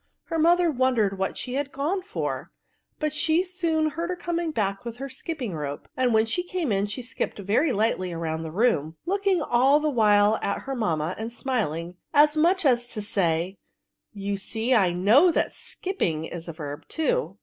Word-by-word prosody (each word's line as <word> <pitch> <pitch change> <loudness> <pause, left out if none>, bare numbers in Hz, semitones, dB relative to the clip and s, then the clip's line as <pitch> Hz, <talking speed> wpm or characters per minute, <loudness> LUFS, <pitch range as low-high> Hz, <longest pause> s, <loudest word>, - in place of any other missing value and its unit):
Her 325 - -3
mother 345 +1 +4
wondered 240 -7 +1
what 190 - -2
die 250 - -7
was 285 - -2
gone 290 +8 -2
for; 405 +4 -4 0.5
but 305 -1 -1
she 315 +3 +2
soon 335 -4 0
heard 335 +3 -3
her 365 - -1
coming 345 -1 -2
back 200 -8 -1
with 235 -1 -6
her 275 +2 -5
skipping 260 - -5
rope; 145 -2 -5
and 255 -1 +2
when 220 0 +4
she 230 +11 0
came 355 -6 -2
in, 200 0 +1
she 210 +5 -5
skipped 240 - -3
very 210 - +1
lightly 205 -3 0
roimd 165 -2 -3
the 160 - -5
room, 165 -6 +1
looking 390 -2 +1
all 265 +4 +4
the 305 0 0
while 210 -3 +4
at - - -2
her 270 - -4
mamma, 170 - -1
and 225 +1 -4
smiling, 180 - -2 0.2
as 295 +1 +6
much 345 +3 +3
as 240 -3 +3
to 215 - -2
say, 180 -2 0 0.3
" - - -59
You 200 0 -1
see 225 +5 -1
I 195 -7 +4
know 210 - +5
that 335 - +1
skipping 170 - -3
is 170 0 -7
a 165 - -5
verb 150 -1 -7
too." 485 +11 -1
240 Hz, 195 wpm, -25 LUFS, 195-315 Hz, 0.5 s, as